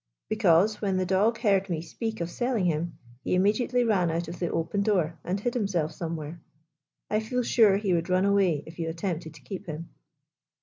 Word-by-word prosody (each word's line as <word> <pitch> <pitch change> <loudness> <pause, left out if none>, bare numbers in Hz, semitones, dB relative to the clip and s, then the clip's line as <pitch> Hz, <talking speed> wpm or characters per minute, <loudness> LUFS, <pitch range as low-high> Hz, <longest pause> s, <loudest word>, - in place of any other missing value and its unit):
" - - -61
Because, 210 -1 +3
when 195 -3 0
the 185 - +1
dog 200 +5 +2
heard 195 -4 +2
me 165 -3 -1
speak 220 +5 -5
of 170 0 -3
selling 240 -6 0
him, 165 0 -1 0.3
he - - +1
immediately 215 +6 +2
ran 195 -7 +2
out 165 +1 -2
of 170 - -7
the 175 - -1
open 165 +5 -1
door 175 -6 +1
and 185 +3 -2
hid 240 +4 -1
himself 190 -9 0
somewhere. 160 -1 -5 0.7
I 215 - +3
feel 250 +3 -1
sure 215 -4 +5
he 200 -3 0
would 170 +1 0
run 185 +1 +3
away 190 -7 +2
if 165 +1 -12
you 165 -1 -1
attempted 165 -2 -4
to - - -14
keep 190 -3 -7
him." 160 +1 -6
185 Hz, 205 wpm, -27 LUFS, 165-210 Hz, 0.7 s, sure